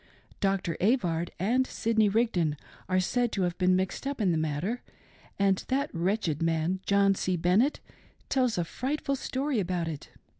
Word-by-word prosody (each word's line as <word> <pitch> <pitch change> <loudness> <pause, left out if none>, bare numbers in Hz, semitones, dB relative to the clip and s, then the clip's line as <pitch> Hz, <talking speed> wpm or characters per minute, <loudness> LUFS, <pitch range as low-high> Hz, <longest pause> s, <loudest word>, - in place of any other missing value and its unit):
Dr. 195 -4 0
Avard 175 -6 +1
and 245 +8 +1
Sidney 220 -2 +1
Rigdon 190 -9 +1 0.3
are 185 0 +3
said 240 +6 +1
to 195 - 0
have 175 -1 0
been 185 0 +4
mixed 190 +8 -2
up 280 -1 -3
in 195 -5 +2
the - - +1
matter, 160 +10 -2 0.6
and 195 -1 +2
that 275 +3 -1
wretched 175 -3 0
man, 165 +3 0
John 200 0 +4
C. 185 -1 -1
Bennett, 185 - +2 0.5
tells 255 -5 +1
a 175 - +1
frightful 275 - -2
story 265 -1 -1
about 180 -3 -1
it. 155 -3 -6
195 Hz, 160 wpm, -28 LUFS, 175-240 Hz, 0.6 s, been